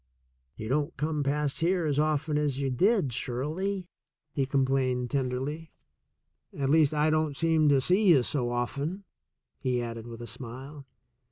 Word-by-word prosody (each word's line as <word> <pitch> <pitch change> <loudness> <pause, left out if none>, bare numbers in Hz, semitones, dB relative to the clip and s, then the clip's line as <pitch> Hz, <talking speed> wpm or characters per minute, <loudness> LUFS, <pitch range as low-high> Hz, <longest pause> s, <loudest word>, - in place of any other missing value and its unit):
"You 110 - -6
don't 145 +5 -1
come 150 +1 -1
past 145 0 0
here 175 +1 +1
as 145 -2 +1
often 155 0 +1
as 145 -3 0
you 135 -1 0
did, 185 - +2
Shirley," 160 - -2 0.5
he 135 -3 0
complained 130 -3 +1
tenderly. 140 +4 -2 0.8
''At 135 -1 -1
least, 155 -1 +5
I 155 0 +2
don't 155 -2 0
seem 160 -2 +3
to 140 -1 +5
see 185 +10 +3
you 140 -7 +6
so 125 -2 -1
often," 140 +10 -2 0.6
he 125 -2 0
added 115 -1 -5
with 115 0 -8
a - - -5
smile. 130 +5 -8
140 Hz, 155 wpm, -28 LUFS, 130-155 Hz, 0.8 s, you